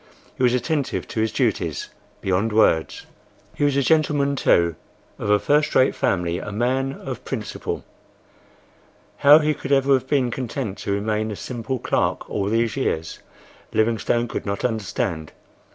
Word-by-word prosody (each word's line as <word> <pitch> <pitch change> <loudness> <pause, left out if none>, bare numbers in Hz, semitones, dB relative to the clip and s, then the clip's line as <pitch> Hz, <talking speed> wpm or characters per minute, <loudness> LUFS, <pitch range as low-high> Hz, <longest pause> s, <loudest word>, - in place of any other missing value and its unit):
He - - -9
was 125 -1 +4
attentive 140 +2 -1
to - - -3
his 110 -1 0
duties, - - -1 0.3
beyond 95 +4 0
words. 85 -7 +2 0.5
He - - -2
was 145 -1 +2
a 140 - +3
gentleman, 145 -2 +2
too,—of 85 - -1
a 105 - +5
first 150 +8 +1
rate 130 - +4
family—a 90 +2 -1
man 130 +5 0
of 130 -2 -7
principle. 110 -6 -5 1.3
How 145 +2 +8
he 155 -1 +2
could 140 -1 -7
ever 135 0 +4
have 130 -1 +1
been 130 -4 +1
content 120 -4 -4
to - - -3
remain 105 +2 -1
a 105 - -4
simple 125 +4 -4
clerk - - -1
all 100 - -2
these 115 -1 +1
years, 80 -12 -2 0.5
Livingstone 115 +2 +1
could - - -4
not 100 +2 -2
understand. 100 -7 -2
120 Hz, 150 wpm, -22 LUFS, 105-135 Hz, 1.3 s, How